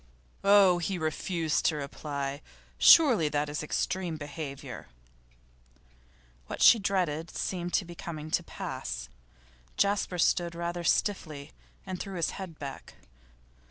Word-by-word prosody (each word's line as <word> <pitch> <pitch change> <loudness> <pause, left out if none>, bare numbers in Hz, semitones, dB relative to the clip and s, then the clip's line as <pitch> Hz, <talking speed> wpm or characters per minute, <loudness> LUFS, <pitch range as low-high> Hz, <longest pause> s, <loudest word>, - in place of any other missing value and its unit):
'Oh, 195 -3 +6
he 185 +2 -2
refused 160 0 -1
to 160 - +3
reply! 140 0 -4 0.4
Surely 245 - +7
that 145 0 -1
is 150 - -3
extreme 170 +2 -2
behaviour.' 145 - -7 1.6
What - - -6
she 230 - +8
dreaded 175 -5 -1
seemed 175 -2 -3
to 190 - +1
be 175 - -9
coming 155 -2 -7
to - - +2
pass. - - -6 0.7
Jasper 200 -2 +1
stood 170 0 +1
rather 170 0 -3
stiffly, 155 -6 -1 0.3
and 185 -2 -5
threw 195 -1 -6
his 170 -2 0
head 185 -5 -8
back. 140 -2 -8
170 Hz, 125 wpm, -29 LUFS, 150-185 Hz, 1.6 s, she